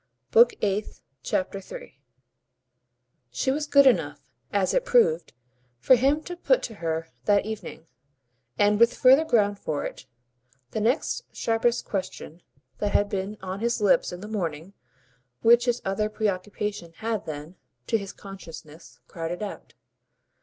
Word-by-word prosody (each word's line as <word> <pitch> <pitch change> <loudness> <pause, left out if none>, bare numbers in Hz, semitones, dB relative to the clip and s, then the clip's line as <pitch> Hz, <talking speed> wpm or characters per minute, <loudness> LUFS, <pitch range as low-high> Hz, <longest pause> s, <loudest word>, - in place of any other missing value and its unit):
Book 235 +2 +6
Eighth, 205 +1 -1 0.2
Chapter 190 +8 -2
3 145 - -11 1.3
She 125 - -1
was 295 +2 -2
good 280 -1 +6
enough, 260 - +3 0.3
as - - +1
it - - +2
proved, 175 - +3 0.5
for 190 - +4
him 275 +5 +2
to 355 - -6
put - - +2
to 230 - -5
her 165 -4 -3 0.2
that 205 -1 +3
evening, 215 -6 -7 0.7
and 205 +1 +3
with 235 +1 +4
further 265 +4 +6
ground 205 -9 +2
for 150 -2 -3
it, - - -8 0.6
the 220 - -2
next 250 - 0
sharpest 230 +1 0
question 185 -3 -5 0.4
that 205 -1 -1
had 205 0 +2
been 200 +2 -3
on 190 +1 -4
his 235 +2 0
lips 205 -2 +3
in 180 0 -8
the 210 - -7
morning 175 -4 -4 0.7
which 235 +1 +6
his 245 -1 0
other 195 +2 0
preoccupation 205 -3 -3
had 220 +3 -3
then, 155 +3 -7 0.3
to 225 - +1
his 195 -1 -7
consciousness, 165 -5 -12
crowded 170 +4 -5
out. 205 - -8
205 Hz, 145 wpm, -26 LUFS, 180-235 Hz, 1.3 s, Book